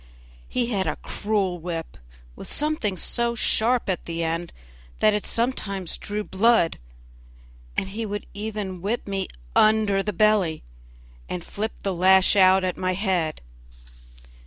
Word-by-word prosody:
He 245 -1 -1
had 195 -3 0
a - - -1
cruel 200 -4 -1
whip 165 -1 -5 0.4
with - - -9
something 295 -11 +1
so 235 +5 +1
sharp 235 +1 +2
at 185 -3 -2
the 165 0 -3
end 165 +1 -2 0.5
that 215 -1 +4
it 210 - -1
sometimes 200 -7 -1
drew 210 +1 -3
blood, 210 -3 +2 1.0
and 190 - 0
he 220 +4 -4
would 205 0 -4
even 205 -3 -5
whip 215 +6 -2
me 195 -1 -2 0.3
under 215 -2 +4
the 210 - -2
belly, 200 -5 +2 0.7
and 180 - -4
flip 215 +5 -4
the 195 - 0
lash 190 +2 +5
out 190 -1 +6
at 185 -1 -1
my 185 0 0
head. 180 -5 -1
200 Hz, 140 wpm, -24 LUFS, 185-215 Hz, 1.0 s, out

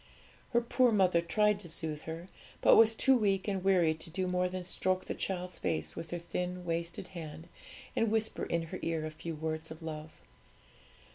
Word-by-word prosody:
Her 235 - +3
poor 245 +1 +3
mother 185 -5 +4
tried 210 +4 +2
to 180 -4 -9
soothe 155 -2 -1
her, 165 +2 -6 0.3
but - - +7
was 225 0 +6
too 265 +3 +5
weak 200 -5 +1
and 195 -3 -1
weary 180 -5 +4
to 160 +1 -6
do 185 +3 -1
more 180 0 +1
than 185 0 -4
stroke 185 +1 0
the - - -3
child's 180 -1 -4
face 160 - -1
with 165 -1 -6
her 175 - -3
thin, 180 +1 -4
wasted 170 +2 -2
hand, 160 -2 -8 0.5
and 225 - +2
whisper 220 0 0
in 170 0 0
her 165 - -6
ear 165 -1 -1
a 155 - -4
few 160 +1 -6
words 160 +1 -3
of 160 +1 -9
love. 155 -1 -5
175 Hz, 195 wpm, -32 LUFS, 160-195 Hz, 0.5 s, but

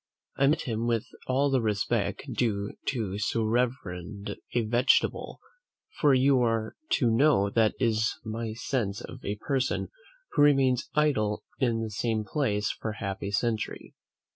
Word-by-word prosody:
I 140 0 +3
met 150 - +2
him 115 -1 -2
with 115 -2 +1 0.2
all 135 +2 +2
the 130 -2 +3
respect 105 -3 0
due 105 -4 -1
to 105 -6 -2
so 115 +1 0
reverend 110 -4 -2 0.2
a 120 - +3
vegetable; 120 +4 +2 0.6
for 145 -3 +5
you 130 0 +4
are 115 -2 0 0.2
to 120 -6 +3
know 115 -5 +4
that 110 -1 +3
is 110 -2 +1
my 110 0 -3
sense 115 -3 -2
of 130 - -10
a 100 - -2
person 130 +4 -1 0.4
who - - +2
remains 135 -4 +4
idle 130 -9 +1 0.2
in 115 -4 +1
the 110 - -4
same 110 0 -1
place 105 -3 0
for 110 - -5
half 100 -2 -5
a 100 - -3
century. 110 +1 -2
115 Hz, 150 wpm, -28 LUFS, 105-130 Hz, 0.6 s, for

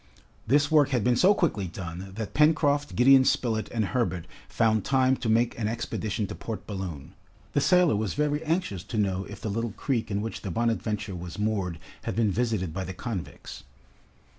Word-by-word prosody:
This 145 +4 +3
work 150 -3 +5
had 125 -6 +1
been 125 0 +3
so 190 +10 +5
quickly 110 - 0
done, 90 +2 -7
that 110 -1 -5
Pencroft, 145 -1 +3
Gideon 130 +2 +7
Spilett, 115 -4 0
and 110 -3 0
Herbert 95 -7 -1 0.2
found 110 -2 +2
time 130 -1 +3
to 115 - -3
make 115 +2 +2
an 105 - 0
expedition 110 -1 -2
to - - -6
Port 110 -2 -6
Balloon, 90 -9 -6 0.4
The 145 - +2
sailor 180 - +4
was 105 -1 -2
very 150 +1 0
anxious 160 - -1
to 110 - -5
know 95 -2 0
if - - -10
the 110 - -3
little 115 0 -2
creek 115 -4 -2
in 100 0 -1
which 115 - -5
the 100 - -5
"Bonadventure" 105 -1 -1
was 90 +1 -7
moored, 100 -5 -1 0.3
had - - -2
been 110 -3 +2
visited 110 -6 -1
by 95 +2 -3
the 95 0 -6
convicts. 95 - -6
110 Hz, 190 wpm, -27 LUFS, 95-130 Hz, 0.4 s, Gideon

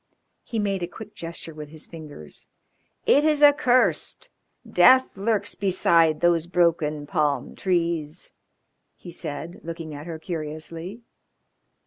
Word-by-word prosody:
He 230 - -5
made 200 -3 0
a 175 - -2
quick 210 +4 -11
gesture 165 -1 -7
with 150 -1 -9
his 155 0 -11
fingers. 150 - -10 0.6
"It 285 - +5
is 305 -1 +3
accursed. 285 -4 +3 0.4
Death 260 0 +5
lurks 205 +1 -1
beside 170 -5 +3
those 170 -1 +3
broken 165 -4 +1
palm 145 -5 -1
trees," 170 -3 -1 0.6
he 175 - -11
said, 165 0 -6
looking 165 -1 -6
at 145 +3 -8
her 165 -2 -5
curiously. 165 +5 -6
170 Hz, 120 wpm, -25 LUFS, 155-200 Hz, 0.6 s, It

